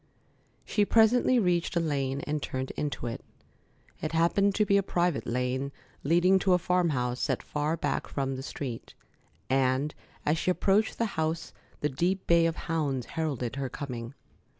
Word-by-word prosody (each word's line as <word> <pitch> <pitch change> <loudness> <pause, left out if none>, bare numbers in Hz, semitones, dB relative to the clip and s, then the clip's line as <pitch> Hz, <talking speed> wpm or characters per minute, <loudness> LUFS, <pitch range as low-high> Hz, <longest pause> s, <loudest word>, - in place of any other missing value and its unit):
She 210 - +2
presently 230 +4 +4
reached 180 -5 +1
a - - +3
lane 140 -4 -1
and 150 +1 -2
turned 130 0 -3
into 145 -4 -3
it. 115 - -4 0.8
It 155 - -3
happened 195 +5 +3
to 210 - +3
be 200 -1 +4
a - - +4
private 175 -4 0
lane 125 +3 -1 0.3
leading 175 +5 +4
to 185 0 +3
a - - +6
farm 180 -1 +1
house 125 -3 -1
set - - -1
far 150 +2 -1
back 145 -3 -1
from 135 -1 -2
the 130 - -5
street, 135 -3 -6 0.5
and 135 +2 +1 0.3
as 155 +2 +2
she - - 0
approached 195 +4 +2
the 230 - +1 0.2
house 160 +1 -2 0.3
the 150 - +1
deep 180 +7 -1
bay 170 -1 +5
of 165 - -1
hounds 145 -7 -1
heralded 140 -6 -2
her 135 -2 -2
coming. 125 -2 -6
155 Hz, 170 wpm, -29 LUFS, 135-180 Hz, 0.8 s, a